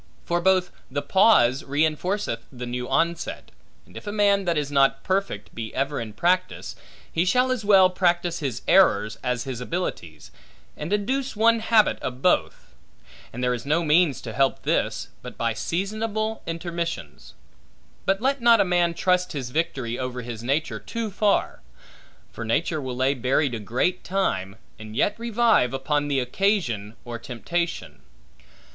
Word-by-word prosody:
For 175 0 0
both 185 0 +2 0.2
the 145 - -3
pause 165 - +4
reinforceth 155 - -1
the 125 -2 -7
new 125 0 -4
onset; 165 +5 -1 0.3
and - - -20
if - - -9
a - - -2
man 200 -2 +2
that 170 -2 +1
is 145 -1 -2
not 135 -1 +3
perfect, 185 - -2
be 110 -1 -5
ever 140 +1 -1
in 110 -2 -7
practice, 180 - 0 0.4
he 165 - +2
shall 250 +8 +2
as 250 -4 -1
well 195 -2 +6
practise 175 -1 0
his 135 -6 -4
errors, 110 - +4
as 125 -1 -1
his 130 -3 -5
abilities, 125 - -5 0.4
and 150 +4 -6
induce 255 +6 -1
one 230 +2 +4
habit 220 -1 +3
of 130 +1 -6
both; 180 - +1 0.6
and 125 +2 -5
there 125 0 +2
is 120 -1 -4
no 155 +4 +1
means 155 -1 +3
to 115 - -7
help 135 +2 +1
this, - - -1
but - - -10
by 115 -1 0
seasonable 215 - -2
intermissions. 170 0 -5 0.7
But 195 0 +2
let 270 +1 +1
not 235 -1 +6
a - - +4
man 175 -1 +1
trust 180 0 +1
his 130 -4 -5
victory 130 -6 -2
over 125 -1 -4
his 115 -2 -6
nature, 135 -4 -1
too 220 - -4
far; 205 +1 +1 0.7
for 115 - -7
nature 155 +7 0
will 130 -2 -4
lay 130 +2 +2
buried 130 +1 +1
a 115 - -3
great 125 - -1
time, 100 - -1 0.2
and 110 0 -9
yet 205 - +2
revive, 230 - +2
upon 145 +2 0
the 140 -2 +1
occasion 125 - 0
or 120 -1 -6
temptation. 170 +9 -4
165 Hz, 160 wpm, -24 LUFS, 125-195 Hz, 0.7 s, well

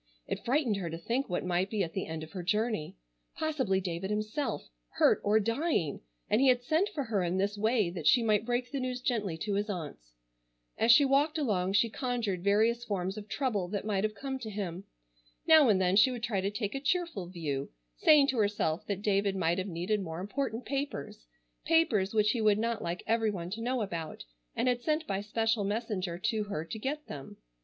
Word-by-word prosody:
It - - -4
frightened 250 -5 +1
her 180 -4 -3
to 165 - -5
think 235 +10 -2
what 180 0 -2
might 180 +2 0
be 210 -2 0
at 165 - -5
the 190 - -3
end 160 -1 -5
of 155 - -10
her 185 - -5
journey. 210 - -1 0.4
Possibly 270 -12 0
David 180 0 -4
himself, 215 - -2 0.3
hurt - - +4
or 210 +2 +4
dying, 230 - 0 0.3
and 215 - +2
he 275 - +5
had 250 -1 +4
sent 325 +9 +1
for 285 - -3
her 220 -5 -1
in 175 +1 0
this 200 +2 0
way 215 -3 +1
that 175 - -3
she 245 - +5
might 215 -2 +2
break 245 +1 -2
the 280 - -2
news 255 -1 -2
gently 215 -9 -1
to 205 +5 -3
his 205 +2 -1
aunts. 145 - -6 0.6
As 225 +1 +4
she 280 +5 +7
walked 285 +4 +2
along 195 -10 0
she 220 +3 +4
conjured 225 -6 -2
various 220 +4 +3
forms 195 -4 -2
of 210 -1 -8
trouble 210 -8 -1
that 200 +2 -4
might 200 -2 0
have 215 0 -1
come 270 +1 -4
to 225 -4 -6
him. 195 -3 -5 0.6
Now 315 -5 +7
and 200 -3 +4
then 185 0 +2
she 210 +6 +6
would 245 -3 -5
try 215 -6 0
to 195 - 0
take 205 0 -3
a 275 - -2
cheerful 310 - -1
view, 150 -6 -3 0.3
saying 295 -2 +6
to 255 - 0
herself 205 -6 0
that 200 -1 -3
David 200 -1 +1
might 175 -1 +1
have 185 - -3
needed 185 +4 -1
more 165 -3 -5
important 235 +4 -3
papers, 270 - -4 0.4
papers 315 - +3
which 215 -1 +3
he 235 - -1
would 210 -1 +4
not 230 0 -1
like 170 +1 -4
everyone 210 -6 0
to 225 +3 -4
know 245 0 0
about, 170 - -5 0.3
and - - 0
had 245 -1 +1
sent 310 +3 0
by 195 -5 -2
special 225 +1 0
messenger 200 -4 -2
to 215 +3 -1
her 165 -6 -4
to 220 +7 -6
get 295 +6 -3
them. 135 -7 -9
210 Hz, 215 wpm, -30 LUFS, 185-245 Hz, 0.6 s, she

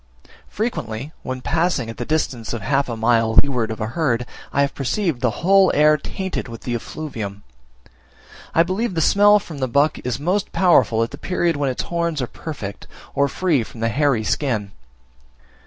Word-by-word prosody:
Frequently, 150 - -3
when 130 0 -5
passing 165 -5 0
at 115 - -7
the 120 - -3
distance 130 -8 -1
of 115 -4 -4
half 140 +3 +1
a 115 - -3
mile 115 0 +2
to - - +9
leeward 125 -6 -1
of 110 - -5
a 110 - -1
herd, 125 -1 0 0.3
I 140 - +2
have 140 0 +1
perceived 140 - -1
the 125 +4 -1
whole 195 0 +6
air 150 +1 +6
tainted 190 +4 -4
with 115 -1 -9
the 120 - -3
effluvium. 115 -6 -5 1.1
I 165 - +6
believe 190 +3 -2
the 160 - +1
smell 205 +5 +6
from 165 -7 -7
the 130 - 0
buck 140 +5 +2
is 125 +1 -2
most 180 +7 0
powerful 125 - +4
at 115 - -4
the - - -9
period 175 -3 0
when 145 -1 0
its 125 - -2
horns 170 -2 -1
are 125 - 0
perfect, 120 -7 -7 0.3
or 140 - +2
free 165 -4 +1
from 115 0 -9
the 115 - +1
hairy 130 -2 +1
skin. 110 -5 -1
140 Hz, 190 wpm, -21 LUFS, 115-165 Hz, 1.1 s, to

